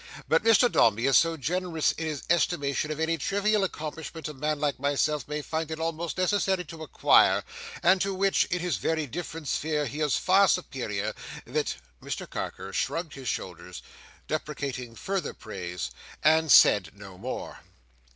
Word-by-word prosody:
But -, -, +3 dB
Mr 225 Hz, +1 st, +6 dB
Dombey 115 Hz, -, +3 dB
is 135 Hz, -, +4 dB
so 165 Hz, -1 st, +4 dB
generous 170 Hz, +1 st, 0 dB
in 160 Hz, -, -4 dB
his 150 Hz, -3 st, -4 dB
estimation 155 Hz, -4 st, +1 dB
of 155 Hz, 0 st, -4 dB
any 160 Hz, 0 st, 0 dB
trivial 205 Hz, +1 st, +1 dB
accomplishment 160 Hz, -2 st, -5 dB
a 150 Hz, -, -6 dB
man 150 Hz, +2 st, -2 dB
like 145 Hz, -3 st, -1 dB
myself 145 Hz, +1 st, 0 dB
may 150 Hz, 0 st, -3 dB
find 160 Hz, +1 st, -3 dB
it 160 Hz, 0 st, -5 dB
almost 165 Hz, +1 st, -3 dB
necessary 190 Hz, -1 st, +1 dB
to 160 Hz, +1 st, -10 dB
acquire, 155 Hz, -, +4 dB, 0.4 s
and 185 Hz, 0 st, +5 dB
to 195 Hz, -, 0 dB
which, 195 Hz, +1 st, +2 dB
in 180 Hz, 0 st, -2 dB
his 180 Hz, 0 st, -1 dB
very 160 Hz, -1 st, -1 dB
different 160 Hz, +2 st, -6 dB
sphere, 150 Hz, 0 st, 0 dB
he 145 Hz, +4 st, -5 dB
is 150 Hz, -3 st, +2 dB
far 195 Hz, +1 st, +4 dB
superior, 110 Hz, -, -1 dB, 0.3 s
that—" -, -, -1 dB, 0.3 s
Mr -, -, -5 dB
Carker -, -, -6 dB
shrugged 165 Hz, -2 st, -2 dB
his 135 Hz, -2 st, -8 dB
shoulders, -, -, -5 dB, 0.4 s
deprecating 140 Hz, -6 st, -4 dB
further 195 Hz, -, -3 dB
praise, 90 Hz, -, -6 dB, 0.3 s
and 160 Hz, 0 st, +4 dB
said 95 Hz, -5 st, +6 dB
no 95 Hz, -3 st, -11 dB
more. 125 Hz, +5 st, -6 dB
155 Hz, 160 wpm, -27 LUFS, 140-175 Hz, 0.4 s, Mr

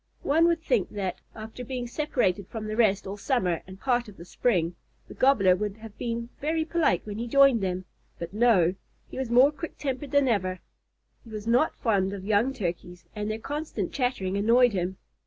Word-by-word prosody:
One 325 Hz, +4 st, +4 dB
would 335 Hz, -1 st, +1 dB
think 240 Hz, -, +1 dB
that, 190 Hz, -3 st, -3 dB
after 220 Hz, +3 st, -8 dB
being 250 Hz, 0 st, -4 dB
separated 240 Hz, -, -1 dB
from 220 Hz, -2 st, -6 dB
the 215 Hz, 0 st, -3 dB
rest 210 Hz, -3 st, +2 dB
all 195 Hz, +2 st, -5 dB
summer 190 Hz, -, 0 dB
and 190 Hz, 0 st, -11 dB
part 245 Hz, -1 st, 0 dB
of 205 Hz, -, -13 dB
the 170 Hz, -, -10 dB
spring, 175 Hz, -4 st, 0 dB, 0.3 s
the -, -, -10 dB
Gobbler 210 Hz, -9 st, +4 dB
would 210 Hz, +1 st, -3 dB
have 220 Hz, -1 st, -11 dB
been 235 Hz, 0 st, -3 dB
very 315 Hz, +2 st, 0 dB
polite 320 Hz, -, +1 dB
when 210 Hz, 0 st, -6 dB
he 235 Hz, -, -3 dB
joined 275 Hz, -2 st, +5 dB
them, 185 Hz, -1 st, -2 dB, 0.3 s
but 170 Hz, +2 st, -7 dB
no; 210 Hz, -6 st, +4 dB, 0.4 s
he -, -, -6 dB
was 260 Hz, -3 st, -2 dB
more 255 Hz, +4 st, +6 dB
quick 320 Hz, +2 st, -8 dB
tempered 275 Hz, 0 st, -3 dB
than 285 Hz, -1 st, +3 dB
ever. 185 Hz, -5 st, 0 dB, 0.6 s
He 230 Hz, -, -15 dB
was 215 Hz, -1 st, -7 dB
not 245 Hz, +7 st, +2 dB
fond 200 Hz, -4 st, 0 dB
of 195 Hz, -1 st, -7 dB
young 215 Hz, +5 st, +2 dB
Turkeys, 180 Hz, -6 st, -5 dB
and 210 Hz, 0 st, -3 dB
their 215 Hz, -, -2 dB
constant 280 Hz, -, -4 dB
chattering 245 Hz, -8 st, -1 dB
annoyed 235 Hz, +3 st, +4 dB
him. 185 Hz, 0 st, -2 dB
225 Hz, 195 wpm, -27 LUFS, 190-255 Hz, 0.6 s, more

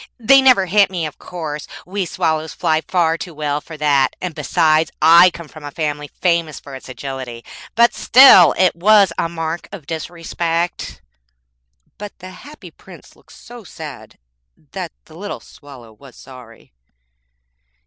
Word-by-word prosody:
They 270 Hz, +4 st, +5 dB
never 255 Hz, -8 st, +4 dB
hit 200 Hz, +2 st, +3 dB
me, 175 Hz, -4 st, -3 dB
of 150 Hz, -, -8 dB
course; 155 Hz, -4 st, -7 dB, 0.2 s
we 190 Hz, 0 st, -3 dB
swallows 160 Hz, -1 st, -2 dB
fly 160 Hz, -2 st, 0 dB
far 165 Hz, -3 st, +1 dB
too 175 Hz, -3 st, -8 dB
well 150 Hz, -1 st, -2 dB
for 160 Hz, 0 st, -11 dB
that, 145 Hz, -3 st, +1 dB
and 180 Hz, -2 st, -5 dB
besides, 155 Hz, +2 st, +1 dB
I 170 Hz, +3 st, +7 dB
come 170 Hz, -1 st, -11 dB
of 155 Hz, +1 st, -14 dB
a 145 Hz, -, -6 dB
family 150 Hz, -1 st, -4 dB
famous 170 Hz, -4 st, 0 dB
for 140 Hz, -, -13 dB
its 130 Hz, 0 st, -10 dB
agility; 130 Hz, -3 st, -7 dB, 0.3 s
but 235 Hz, +1 st, +4 dB
still, 240 Hz, -, +7 dB
it 185 Hz, -3 st, +2 dB
was 200 Hz, 0 st, +4 dB
a 165 Hz, -, -1 dB
mark 165 Hz, 0 st, -5 dB
of 190 Hz, -8 st, -10 dB
disrespect.' 170 Hz, +1 st, -4 dB, 1.0 s
But 205 Hz, -1 st, -9 dB
the 185 Hz, 0 st, -11 dB
Happy 295 Hz, +10 st, -13 dB
Prince -, -, -17 dB
looked -, -, -21 dB
so 240 Hz, -1 st, -13 dB
sad 155 Hz, -7 st, -11 dB, 0.5 s
that 180 Hz, -4 st, -6 dB
the 155 Hz, -, -17 dB
little 205 Hz, +4 st, -7 dB
Swallow 130 Hz, -6 st, -15 dB
was 130 Hz, +4 st, -17 dB
sorry. 125 Hz, -, -15 dB
165 Hz, 155 wpm, -18 LUFS, 150-185 Hz, 1.0 s, I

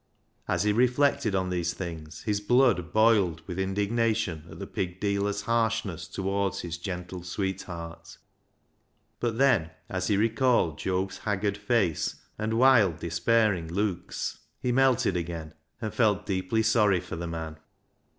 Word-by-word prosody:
As -, -, +1 dB
he 105 Hz, 0 st, +2 dB
reflected 125 Hz, -1 st, +2 dB
on 95 Hz, -1 st, 0 dB
these 85 Hz, -1 st, -1 dB
things, 80 Hz, -4 st, -7 dB
his 105 Hz, -2 st, 0 dB
blood 115 Hz, -6 st, +3 dB
boiled 105 Hz, -7 st, +3 dB
with 95 Hz, -2 st, -5 dB
indignation 100 Hz, -3 st, 0 dB
at -, -, -10 dB
the -, -, -6 dB
pig 90 Hz, -1 st, -4 dB
dealer's 100 Hz, 0 st, 0 dB
harshness 110 Hz, -6 st, -1 dB
towards 100 Hz, 0 st, -1 dB
his 85 Hz, -1 st, -5 dB
gentle 90 Hz, -1 st, -5 dB
sweetheart. 90 Hz, -2 st, -5 dB, 1.0 s
But 115 Hz, -2 st, -1 dB
then, 125 Hz, -12 st, +3 dB, 0.2 s
as 95 Hz, -1 st, -2 dB
he 105 Hz, -, +2 dB
recalled 115 Hz, -, +2 dB
Job's 95 Hz, +1 st, -2 dB
haggard 100 Hz, -1 st, -1 dB
face 100 Hz, -5 st, 0 dB, 0.2 s
and 110 Hz, +1 st, -1 dB
wild, 115 Hz, -9 st, +5 dB
despairing 90 Hz, +2 st, +1 dB
looks, 90 Hz, +1 st, -2 dB, 0.2 s
he 125 Hz, -, -1 dB
melted 130 Hz, -6 st, +3 dB
again, 85 Hz, -2 st, -4 dB, 0.3 s
and 110 Hz, -2 st, -4 dB
felt 105 Hz, -4 st, +2 dB
deeply 95 Hz, +3 st, 0 dB
sorry 105 Hz, -4 st, +4 dB
for 90 Hz, -, -7 dB
the 85 Hz, +1 st, -4 dB
man. 80 Hz, -1 st, -5 dB
100 Hz, 140 wpm, -27 LUFS, 85-110 Hz, 1.0 s, wild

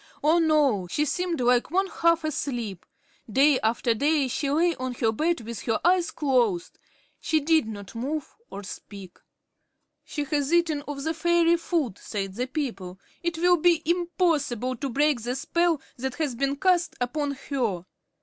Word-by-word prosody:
Oh, 315 Hz, +3 st, +4 dB
no! 295 Hz, -, +2 dB
She 295 Hz, +12 st, 0 dB
seemed 345 Hz, +3 st, -1 dB
like 245 Hz, 0 st, +3 dB
one 380 Hz, +4 st, +2 dB
half 335 Hz, -3 st, +1 dB
asleep. 245 Hz, -, -3 dB, 0.4 s
Day 275 Hz, +3 st, +4 dB
after 230 Hz, +2 st, +1 dB
day 285 Hz, +4 st, +2 dB
she 275 Hz, +3 st, -2 dB
lay 335 Hz, +4 st, +2 dB
on 255 Hz, -1 st, -4 dB
her 225 Hz, -1 st, +1 dB
bed 320 Hz, +6 st, 0 dB
with 230 Hz, 0 st, -7 dB
her 225 Hz, -, +1 dB
eyes 355 Hz, -1 st, +3 dB
closed. 245 Hz, -, 0 dB, 0.4 s
She 315 Hz, -, +1 dB
did 315 Hz, -4 st, +2 dB
not 205 Hz, -3 st, -8 dB
move 275 Hz, +6 st, -4 dB
or 200 Hz, -, -7 dB
speak. 195 Hz, -1 st, -10 dB, 0.8 s
"She 295 Hz, -, -4 dB
has 290 Hz, 0 st, -1 dB
eaten 335 Hz, -4 st, +2 dB
of 280 Hz, -1 st, -5 dB
the 320 Hz, +1 st, -1 dB
fairy 340 Hz, +1 st, +3 dB
food," 315 Hz, -, -2 dB
said 195 Hz, -3 st, -4 dB
the 245 Hz, +5 st, -2 dB
people. 210 Hz, -, -4 dB, 0.2 s
"It 340 Hz, -1 st, -2 dB
will 355 Hz, +1 st, +4 dB
be 340 Hz, 0 st, +3 dB
impossible 325 Hz, -, 0 dB
to 275 Hz, -, -3 dB
break 285 Hz, 0 st, +2 dB
the 245 Hz, +3 st, -3 dB
spell 340 Hz, +3 st, +1 dB, 0.2 s
that 265 Hz, +1 st, -3 dB
has 300 Hz, -5 st, -1 dB
been 275 Hz, +3 st, -1 dB
cast 350 Hz, +2 st, +2 dB
upon 280 Hz, +4 st, -1 dB, 0.2 s
her." 220 Hz, -10 st, -1 dB
285 Hz, 165 wpm, -26 LUFS, 240-330 Hz, 0.8 s, Oh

